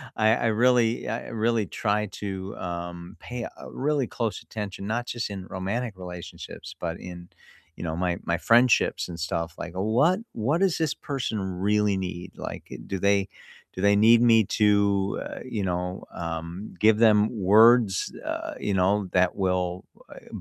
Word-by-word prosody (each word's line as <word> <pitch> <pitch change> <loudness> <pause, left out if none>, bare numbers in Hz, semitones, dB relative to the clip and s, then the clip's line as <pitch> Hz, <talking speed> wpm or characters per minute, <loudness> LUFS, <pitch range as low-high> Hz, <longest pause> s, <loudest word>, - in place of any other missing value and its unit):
I 110 +1 +4
I - - -2
really 120 0 +3
I 115 +3 -3
really 115 -1 0
try 105 +1 -1
to, 95 -1 -5
um, 85 +1 -6
pay, 120 -1 -6
uh, - - -10
really 140 -1 0
close 115 -3 -3
attention, 100 -2 -6
not 120 +3 -1
just 120 -3 -3
in 95 -2 -6
romantic 100 +6 -3
relationships, 90 -2 -9
but 85 0 -4
in, 90 -1 -9 0.5
you - - -8
know, 80 -1 -2
my 90 0 -1
my 85 - 0
friendships 120 +1 +3
and 85 -1 -8
stuff, 85 0 -2
like, 85 - -6
"What 120 - +2
what 125 +8 0
does 190 -4 +2
this 160 -3 +1
person 130 -6 -3
really 100 +2 +1
need?" 90 -1 -5
Like, - - -7 0.2
do 95 - -2
they 100 0 +2 0.4
do 95 - -5
they 100 0 +5
need 115 +3 +6
me 115 -2 +6
to, 100 -1 +2
uh, - - -7
you 110 -5 -3
know, 90 0 -3
um, 85 +3 -5
give 110 0 +5
them 110 -2 +5
words, 110 +1 +5
uh, - - -4
you 105 - -1
know, 95 +1 +3 0.2
that 90 0 +4
will 90 0 -1 0.3
u - - -10
100 Hz, 165 wpm, -26 LUFS, 90-115 Hz, 0.5 s, need